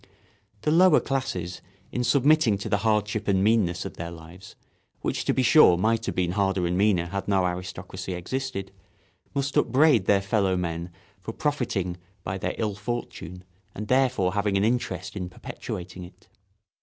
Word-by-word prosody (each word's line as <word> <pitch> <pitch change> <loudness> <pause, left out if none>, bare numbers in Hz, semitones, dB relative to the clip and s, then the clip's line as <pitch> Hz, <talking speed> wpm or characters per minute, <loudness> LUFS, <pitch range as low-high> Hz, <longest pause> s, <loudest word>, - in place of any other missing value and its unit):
The 150 - +1
lower 175 0 +6
classes, 110 - -3 0.3
in 125 - -1
submitting 135 -2 +4
to 100 - -5
the 100 - +2
hardship 105 0 0
and 95 -1 +2
meanness 100 -5 +2
of - - -7
their 85 0 -5
lives—which, 85 +3 -8
to - - +2
be 130 - +1
sure, 115 - +7
might 115 +4 +1
have - - -2
been 90 -1 0
harder 95 -2 +1
and 85 +1 0
meaner 95 -3 +2
had 95 +3 -4
no 95 -2 +2
aristocracy 90 +1 -5
existed—must 100 +3 -6
upbraid 130 -7 +4
their 100 -1 +4
fellow 95 -2 +1
men 85 -1 -3 0.3
for 100 +5 -7
profiting 110 - -1 0.3
by 95 +1 -3
their 90 0 -2
ill 110 -2 -1
fortune 95 -5 -6 0.3
and 105 +1 -6
therefore 130 -8 +2
having 100 -1 +1
an 100 - +2
interest 95 -5 -1
in 90 -3 -4
perpetuating 90 +1 -7
it. 90 - -18
100 Hz, 155 wpm, -26 LUFS, 90-115 Hz, 0.3 s, sure